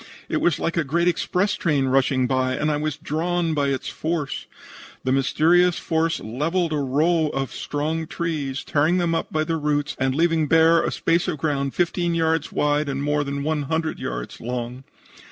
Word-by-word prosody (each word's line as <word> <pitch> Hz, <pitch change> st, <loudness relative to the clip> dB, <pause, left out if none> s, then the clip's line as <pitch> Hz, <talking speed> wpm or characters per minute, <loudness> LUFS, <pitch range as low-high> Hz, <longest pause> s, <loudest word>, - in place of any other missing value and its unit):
It -, -, 0 dB
was 175 Hz, -, +2 dB
like 170 Hz, +1 st, -2 dB
a 165 Hz, -, +3 dB
great 170 Hz, +5 st, 0 dB
express 180 Hz, +3 st, +1 dB
train 145 Hz, -5 st, +1 dB
rushing 130 Hz, 0 st, +2 dB
by, 130 Hz, 0 st, 0 dB
and 150 Hz, +3 st, 0 dB
I 150 Hz, -, 0 dB
was 150 Hz, -1 st, -2 dB
drawn 165 Hz, +2 st, -1 dB
by 145 Hz, -2 st, +1 dB
its 135 Hz, -2 st, -2 dB
force. 155 Hz, -3 st, -3 dB, 0.6 s
The 130 Hz, -, 0 dB
mysterious 165 Hz, +6 st, +3 dB
force 165 Hz, 0 st, 0 dB
levelled 155 Hz, +9 st, -1 dB
a -, -, 0 dB
row 155 Hz, +4 st, +2 dB
of 135 Hz, -1 st, -2 dB
strong 155 Hz, +2 st, -3 dB
trees, 150 Hz, -6 st, -3 dB
tearing 155 Hz, +5 st, +2 dB
them 170 Hz, -2 st, +1 dB
up 165 Hz, -, -2 dB
by 155 Hz, 0 st, +1 dB
the 165 Hz, +1 st, -1 dB
roots 150 Hz, -1 st, -1 dB
and 130 Hz, 0 st, +1 dB
leaving 165 Hz, -1 st, +2 dB
bare 165 Hz, +2 st, +5 dB
a -, -, 0 dB
space 170 Hz, +2 st, +1 dB
of 170 Hz, -4 st, -1 dB
ground 140 Hz, -2 st, -1 dB
fifteen 175 Hz, -1 st, 0 dB
yards 160 Hz, -1 st, +1 dB
wide 150 Hz, 0 st, +1 dB
and 140 Hz, 0 st, -2 dB
more 150 Hz, 0 st, +1 dB
than 140 Hz, 0 st, -3 dB
one 155 Hz, 0 st, 0 dB
hundred 160 Hz, -1 st, -1 dB
yards -, -, -5 dB
long. 125 Hz, +2 st, -5 dB
155 Hz, 190 wpm, -23 LUFS, 140-165 Hz, 0.6 s, bare